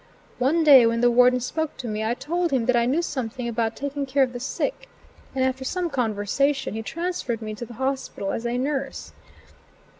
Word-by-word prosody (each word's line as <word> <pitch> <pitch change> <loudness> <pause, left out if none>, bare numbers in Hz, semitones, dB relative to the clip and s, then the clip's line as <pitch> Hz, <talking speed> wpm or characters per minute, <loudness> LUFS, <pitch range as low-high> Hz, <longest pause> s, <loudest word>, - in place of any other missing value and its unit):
One 300 +6 +2
day 270 -6 +8
when 230 0 0
the 245 0 +5
warden 250 +1 +5
spoke 315 +5 -3
to 245 - -6
me, 215 0 -2
I 225 +2 0
told 345 +6 -1
him 255 -5 +1
that 250 0 +3
I 235 0 +3
knew 305 +7 +1
something 250 -5 -4
about 230 -1 -1
taking 285 0 -3
care 270 +1 +3
of 250 -1 -2
the 245 - -5
sick, 275 - -3 0.5
and 260 -1 +2
after 260 0 -1
some 350 +4 -2
conversation, 250 +3 0
he 220 - -3
transferred 330 -4 -3
me 215 -1 -5
to 230 +2 -7
the 235 - -11
hospital 265 -5 -2
as 235 - -3
a 240 +1 -1
nurse. 275 +1 -3
255 Hz, 205 wpm, -24 LUFS, 235-280 Hz, 0.5 s, day